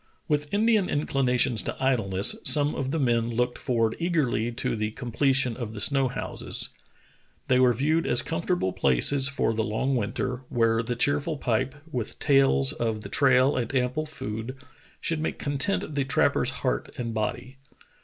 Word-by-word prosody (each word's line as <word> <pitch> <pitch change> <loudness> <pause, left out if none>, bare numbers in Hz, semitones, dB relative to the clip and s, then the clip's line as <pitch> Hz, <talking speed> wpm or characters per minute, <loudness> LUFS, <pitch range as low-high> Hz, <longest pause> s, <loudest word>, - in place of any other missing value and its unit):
With 150 -2 -1
Indian 215 -2 +2
inclinations 130 -5 +1
to - - -5
idleness, 105 -8 +3
some 145 -1 +4
of 135 - -3
the 160 - -1
men 120 -5 +1
looked 120 +1 -1
forward 115 -3 0
eagerl}^ 130 -9 0
to - - -1
the 110 -1 -2
completion 125 +2 0
of 110 -3 -6
the - - -6
snow 135 +5 +3
houses. 125 - -2 0.8
They 130 0 +4
were 125 -1 +5
viewed 150 +7 0
as 120 - +2
comfortable 165 - -1
places 95 - +3
for 140 -5 0
the 110 - -1
long 120 +6 -1
winter, 120 +2 -2
where 115 -1 +2
the 120 +1 -3
cheerful 145 +5 0
pipe, 130 +1 -1 0.2
with 120 -5 -4
tales 135 - +3
of 110 -2 -2
the 100 - -9
trail 130 +2 +3
and 125 +2 -2
ample 130 +5 0
food, 115 -3 -6 0.4
should 165 -2 -2
make 160 - -3
content 145 +3 -1
the 140 -1 0
trap 135 - +2
per's - - 0 0.2
heart - - -1
and 115 -2 -4
body. 120 +4 -4
125 Hz, 165 wpm, -26 LUFS, 115-145 Hz, 0.8 s, were